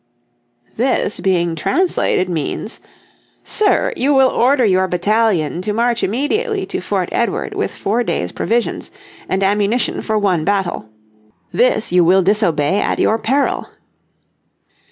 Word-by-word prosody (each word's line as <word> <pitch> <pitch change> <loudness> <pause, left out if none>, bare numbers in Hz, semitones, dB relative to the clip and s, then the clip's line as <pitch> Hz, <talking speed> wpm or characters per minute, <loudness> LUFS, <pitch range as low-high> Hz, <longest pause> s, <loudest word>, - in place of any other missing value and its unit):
This 245 -4 0
being 175 -2 +1
translated 335 - 0
means:" 170 +5 -4 0.6
Sir, 430 +4 +1
you 280 +3 +1
will 265 -1 +5
order 255 0 +2
your 190 -2 +2
battalion 180 -3 0
to 210 +3 -2
march 235 +1 0
immediately 390 - -1
to - - -4
Fort - - -2
Edward - - -1
with - - -2
four 230 +4 -1
days' - - -2
provisions, 235 +1 -2 0.4
and 190 +1 0
ammunition 205 +4 0
for 220 -1 -1
one 190 -6 +1
battle. 190 - -2 0.6
This - - +1
you 180 0 +4
will 185 +3 +4
disobey 190 -3 +1
at - - -1
your 220 - +1
peril." 275 +6 0
210 Hz, 130 wpm, -17 LUFS, 185-245 Hz, 0.6 s, will